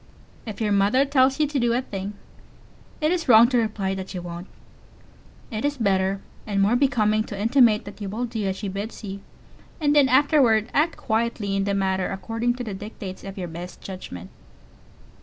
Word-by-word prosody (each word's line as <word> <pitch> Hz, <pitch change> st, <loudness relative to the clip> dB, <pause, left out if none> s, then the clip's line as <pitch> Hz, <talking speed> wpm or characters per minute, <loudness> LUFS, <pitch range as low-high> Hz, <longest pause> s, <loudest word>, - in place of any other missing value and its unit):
If 215 Hz, -, -6 dB
your 215 Hz, -2 st, 0 dB
mother 205 Hz, +7 st, +3 dB
tells 270 Hz, -1 st, +3 dB
you 305 Hz, -, +4 dB
to 290 Hz, -1 st, -1 dB
do 240 Hz, -1 st, +2 dB
a 245 Hz, -, +1 dB
thing, 195 Hz, -2 st, -5 dB, 0.9 s
it 305 Hz, +1 st, +2 dB
is 345 Hz, -6 st, -1 dB
wrong 230 Hz, 0 st, +8 dB
to 250 Hz, -, +2 dB
reply 210 Hz, -4 st, -1 dB
that 190 Hz, 0 st, -6 dB
you 180 Hz, -, -4 dB
won't. 175 Hz, +1 st, -7 dB, 1.0 s
It 215 Hz, -1 st, -3 dB
is 290 Hz, 0 st, 0 dB
better 195 Hz, -3 st, +1 dB, 0.3 s
and 200 Hz, -2 st, -1 dB
more 200 Hz, +4 st, +3 dB
becoming 215 Hz, -5 st, +2 dB
to 200 Hz, -, -7 dB
intimate 230 Hz, -1 st, +4 dB
that 205 Hz, +1 st, -10 dB
you 200 Hz, -, -4 dB
will 225 Hz, +5 st, -2 dB
do 225 Hz, -4 st, -3 dB
as 190 Hz, -, -1 dB
she 205 Hz, -, -5 dB
bids 200 Hz, +4 st, -6 dB
you, 200 Hz, -1 st, -6 dB, 0.6 s
and 295 Hz, -2 st, +2 dB
then 280 Hz, -2 st, +5 dB
afterward 255 Hz, -5 st, +4 dB
act 320 Hz, +3 st, +2 dB
quietly 220 Hz, -3 st, -1 dB
in 195 Hz, 0 st, 0 dB
the 200 Hz, 0 st, 0 dB
matter 190 Hz, -1 st, 0 dB
according 225 Hz, +5 st, -2 dB
to 250 Hz, -, -5 dB
the 215 Hz, -4 st, -5 dB
dictates 195 Hz, -1 st, -8 dB
of 195 Hz, 0 st, -8 dB
your 180 Hz, -2 st, -4 dB
best 175 Hz, +2 st, -8 dB
judgment. 95 Hz, -, -8 dB
215 Hz, 195 wpm, -24 LUFS, 195-245 Hz, 1.0 s, wrong